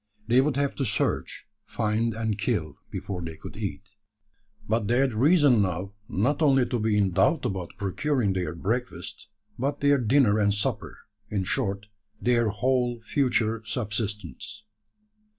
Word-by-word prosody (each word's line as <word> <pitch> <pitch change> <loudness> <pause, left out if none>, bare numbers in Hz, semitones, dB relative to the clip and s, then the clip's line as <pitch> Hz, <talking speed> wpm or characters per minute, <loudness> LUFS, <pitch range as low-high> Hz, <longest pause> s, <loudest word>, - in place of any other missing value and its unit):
They 120 +2 +5
would 140 -1 0
have 140 0 0
to 140 - 0
search, 105 -5 -1 0.2
find, 110 +1 -1
and 110 -2 -1
kill, 95 - -2
before 95 -3 -5
they 80 -1 -6
could - - -10
eat. 100 -3 -4 0.8
But 110 -2 0
they 120 +2 +2
had 135 -2 +2
reason 140 - +5
now 95 +1 -2 0.2
not 125 - +1
only 135 -4 +5
to 120 - -2
be 110 -1 +1
in 100 -2 +2
doubt 100 - +2
about 95 -7 -4
procuring 105 +2 0
their 90 -2 -2
breakfast, 120 +9 -3 0.3
but 140 +3 -1
their 140 -1 +4
dinner 115 -3 +4
and 100 -1 +3
supper 105 - -3 0.3
in 100 -3 -1
short, 100 -1 -1 0.3
their 120 -2 +2
whole 120 +3 0
future 115 -4 +1
subsistence. 105 - -4
110 Hz, 150 wpm, -26 LUFS, 100-130 Hz, 0.8 s, They